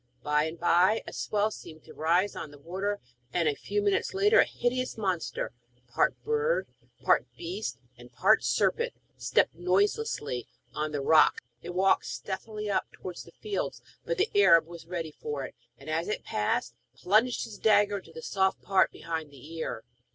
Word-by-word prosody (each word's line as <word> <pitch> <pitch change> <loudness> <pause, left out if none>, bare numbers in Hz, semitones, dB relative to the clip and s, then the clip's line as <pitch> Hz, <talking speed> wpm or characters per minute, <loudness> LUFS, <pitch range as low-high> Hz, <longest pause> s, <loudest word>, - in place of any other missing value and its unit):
By 150 +1 +2
and 160 +1 -6
by 180 +5 +4
a - - -8
swell 210 +1 0
seemed 155 -6 -11
to - - -13
rise 175 +5 +1
on 155 - -6
the 145 - -14
water, 190 +7 -3 0.3
and, 170 -2 +1
a 150 - +3
few 205 +7 -2
minutes 205 - +1
later, 415 +3 +5
a - - +7
hideous 250 +1 -2
monster 190 -5 -2 0.4
part 120 - +1
bird, 450 +2 +1 0.4
part - - +3
beast, 355 +2 -4 0.2
and - - -13
part - - +4
serpent 475 +1 +1 0.2
stepped - - +2
noiselessly 180 - 0 0.3
on 150 0 -2
to 150 - -2
the 140 - -3
rocks. 155 -2 +5 0.2
It 175 +5 -7
walked 190 +1 +3
stealthily 210 +2 -5
up 200 - -1
towards 180 -2 -8
the - - -15
fields, 415 -2 -4 0.2
but - - -2
the 395 +4 +1
Arab 170 -5 +6
was 170 0 -11
ready 170 -3 -4
for 145 -2 -5
it, - - -9 0.2
and, - - -15
as 160 +3 -1
it 210 - -2
passed, 105 - -1 0.2
plunged 220 +6 +2
his 225 -3 -9
dagger 205 -1 +4
into 175 - -16
the 160 0 -9
soft 190 -1 +1
part 190 -1 +3
behind 160 -2 -5
the 145 +3 -13
ear. 125 -8 -4
185 Hz, 180 wpm, -29 LUFS, 160-210 Hz, 0.4 s, a